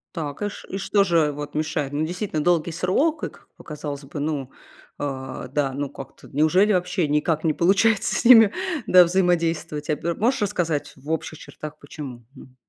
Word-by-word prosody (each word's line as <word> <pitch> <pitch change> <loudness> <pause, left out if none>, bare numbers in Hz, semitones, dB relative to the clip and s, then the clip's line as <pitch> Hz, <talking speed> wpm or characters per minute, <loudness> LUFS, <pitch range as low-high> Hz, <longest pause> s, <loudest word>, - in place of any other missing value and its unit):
Так 150 -2 -5
и 205 - 0
ш - - -11
м, 195 - -3
что 200 +1 +2
же 165 -5 +2
вот 145 0 -7
мешает? 150 -2 -2
Ну, 150 +2 0
действительно 175 -2 -3
долгий 170 -1 +2
срок, 185 - 0
и, - - -1
как - - -21
показалось 150 -2 -7
бы, 145 - -7
ну, 145 -3 -2 0.5
э, 130 -2 -5
да, 140 -1 0
ну, 140 +1 -3
как-то 135 -1 -11
неужели 175 +9 +3
вообще 180 -2 0
никак 150 +2 0
не 160 -2 +2
получается 195 +6 +2
с - - -1
ними, 225 -4 +8 0.4
да, 180 -1 +8
взаимодействовать 165 -4 0
а, 150 - +2
б 170 - -4
м. 170 - -3
Можешь 245 +4 +1
рассказать 175 -7 -1
в 145 +3 -8
общих 160 0 -3
чертах, 155 0 -9
почему? 135 -5 -9
Мгм. 130 -2 -15
160 Hz, 190 wpm, -23 LUFS, 145-180 Hz, 0.5 s, ними